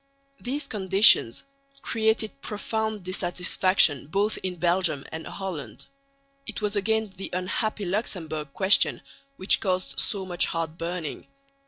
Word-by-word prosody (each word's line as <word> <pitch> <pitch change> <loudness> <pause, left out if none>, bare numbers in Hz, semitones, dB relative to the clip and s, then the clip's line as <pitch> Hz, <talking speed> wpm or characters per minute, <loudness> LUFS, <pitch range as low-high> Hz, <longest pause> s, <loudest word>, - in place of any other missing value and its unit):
These 275 +5 -3
conditions 195 - +4 0.4
created 220 -8 0
profound 220 -1 -3
dissatisfaction 180 -4 +1
both 200 +6 0
in 185 -1 -3
Belgium 175 -4 +1
and 160 0 -6
Holland. 190 -7 -6 0.6
It - - -4
was 210 -1 -1
again 220 0 0
the 195 - -6
unhappy 200 +3 -2
Luxemburg 165 -7 -3
question 190 +6 +3 0.3
which 190 - +4
caused 185 -1 -1
so 195 -2 -1
much 175 -2 +2
heart 165 -1 -3
burning. 170 -2 -5
190 Hz, 120 wpm, -26 LUFS, 170-210 Hz, 0.6 s, conditions